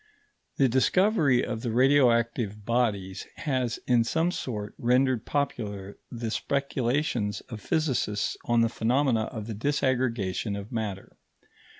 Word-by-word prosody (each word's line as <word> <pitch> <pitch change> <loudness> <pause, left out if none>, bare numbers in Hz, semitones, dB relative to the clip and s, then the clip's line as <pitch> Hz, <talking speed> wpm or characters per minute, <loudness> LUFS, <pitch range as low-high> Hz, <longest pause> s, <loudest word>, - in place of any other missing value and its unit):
The 135 - +4
discovery 140 - +3
of 115 -2 -4
the 120 - -2
radioactive 115 -4 +2
bodies 105 -6 -1
has, 130 -6 -1
in 120 -2 +4
some 165 +9 +1
sort, 105 -10 -4
rendered 125 -1 +2
popular 105 -9 -3
the 115 -2 -4
speculations 130 -5 -1
of 110 -4 -7
physicists 135 -10 0
on 120 -1 +3
the 115 - +4
phenomena 120 0 +1
of 110 -4 -6
the 115 - -5
disaggregation 115 -5 0
of 100 +4 -10
matter. 105 -5 -4
120 Hz, 120 wpm, -27 LUFS, 110-135 Hz, -, The